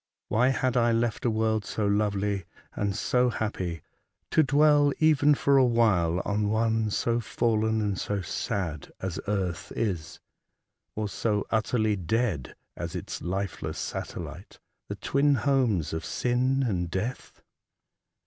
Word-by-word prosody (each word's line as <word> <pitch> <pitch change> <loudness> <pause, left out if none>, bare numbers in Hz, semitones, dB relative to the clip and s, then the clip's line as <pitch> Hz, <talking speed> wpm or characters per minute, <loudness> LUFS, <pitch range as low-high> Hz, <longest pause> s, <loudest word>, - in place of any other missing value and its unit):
' - - -64
Why 120 +4 +3
'had 130 -1 +1
I 120 -1 +3
left 115 0 0
a - - +4
world 110 -1 +1
so 105 +1 -2
lovely 100 -2 0 0.3
and 100 -1 -1
so 125 +3 +2
happy 90 -8 -3 0.5
to - - +5
dwell, 145 0 +4
even 150 -2 +4
for 140 0 +3
a 135 - +6
while, 100 -8 +2
on 105 0 0
one 110 0 +1
so 115 +3 0
fallen 110 0 0
and 100 -3 -1
so 105 -1 -2
sad 85 -4 -3
as 95 -2 -4
earth 95 -4 -2
is, 95 -9 -2 0.8
or 110 0 -2
so 105 +2 -1
utterly 110 -1 +1
dead 95 - -1 0.2
as - - -5
its - - -5
lifeless 95 +2 -3
satellite, - - -6 0.2
— - - -54
the - - -3
twin 140 +1 +2
homes 125 - +1
of 80 - -3
sin 130 +2 +1
and 90 -5 -1
death? 105 +8 -5
110 Hz, 145 wpm, -27 LUFS, 100-125 Hz, 0.8 s, a